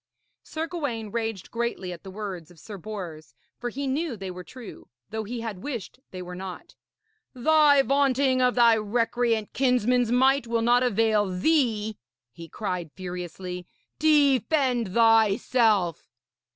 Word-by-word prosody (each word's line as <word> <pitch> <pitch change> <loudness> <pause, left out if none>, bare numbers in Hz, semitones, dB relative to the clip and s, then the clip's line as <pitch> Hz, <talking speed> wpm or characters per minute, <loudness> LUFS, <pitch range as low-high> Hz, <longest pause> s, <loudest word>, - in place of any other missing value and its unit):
Sir 320 0 -4
Gawaine 255 - -4
raged 225 -4 -4
greatly 230 -6 -3
at 170 - -11
the 195 - -10
words 190 -5 -6
of 175 - -18
Sir 205 +2 -9
Bors, 175 -6 -8 0.2
for 245 - -3
he 275 +4 -4
knew 275 -1 -2
they 190 -1 -6
were 180 0 -8
true, 245 +3 -11 0.2
though 220 0 -3
he 235 +2 -5
had 215 -5 -5
wished 250 -2 -6
they 185 -1 -7
were 180 0 -8
not. 185 0 -8 0.6
'Thy 290 +1 +5
vaunting 270 -1 +2
of 250 -1 +3
thy 235 -2 +6
recreant 230 0 0
kinsman's 250 -2 +2
might 265 +1 +3
will 230 0 0
not 240 +1 +4
avail 220 -3 +2
thee,' 220 - 0 0.3
he 165 +5 -11
cried 180 -5 -4
furiously. 180 0 -6 0.3
'Defend 275 - +2
thyself!' 225 - +3
225 Hz, 140 wpm, -26 LUFS, 190-255 Hz, 0.6 s, thy